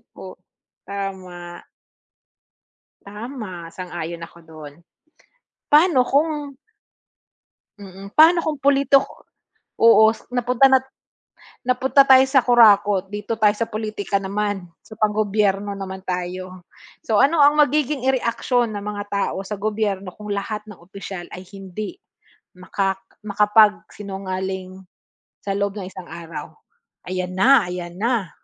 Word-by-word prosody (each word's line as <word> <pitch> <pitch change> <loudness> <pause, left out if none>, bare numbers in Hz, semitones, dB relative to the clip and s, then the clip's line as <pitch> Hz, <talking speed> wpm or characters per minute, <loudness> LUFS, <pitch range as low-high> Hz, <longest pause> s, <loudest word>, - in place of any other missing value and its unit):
O - - -10 0.5
tama. 185 -3 -7 1.4
Tama, 210 -5 -8
sang-ayon 170 -2 -6
ako 170 - -18
do'n. 155 -3 -12 1.0
Pa'no 300 -3 +5
kung 295 -1 0 1.2
mm, 195 0 -12
pa'no 335 +2 +7
kung 310 -2 -2
politiko, 275 0 +2 0.6
oo, 225 -1 +6
s 220 - -3
napunta 250 +1 +2
na 265 -1 +5 0.8
napunta 255 +2 +3
tayo 265 -1 +6
sa 265 0 +3
kurakot, 210 -5 +5
dito 210 +2 -4
tayo 210 -1 +4
sa 225 +2 -3
pulitika 215 -2 -3
naman, 200 -1 -3 0.2
sa 220 - -14
pang-gobyerno 205 -2 0
naman 190 -1 -7
tayo. 185 0 -5 0.4
So, 215 -2 +3
ano 305 +5 +3
ang 290 +1 +6
magiging 295 -1 +1
i-reaksyon 245 -2 0
ng 205 - -5
mga 205 0 -4
tao 200 -1 -1
sa 210 - -5
gobyerno 205 -2 -2
kung 210 -1 -5
lahat 210 +1 -4
ng 210 -5 -13
opisyal 190 0 -9
ay 185 - -10
hindi, 195 - -7 0.6
makak 190 +1 -3 0.2
makapagsinungaling, 195 -3 0 0.6
sa 195 -1 -3
loob 200 0 -1
ng 195 -3 -7
isang 185 -1 -10
araw? 170 -1 -9 0.6
Ayan 185 0 -3
na, 235 +4 +5
ayan 175 -1 -6
na. 225 -3 -1
205 Hz, 120 wpm, -21 LUFS, 190-240 Hz, 1.4 s, pa'no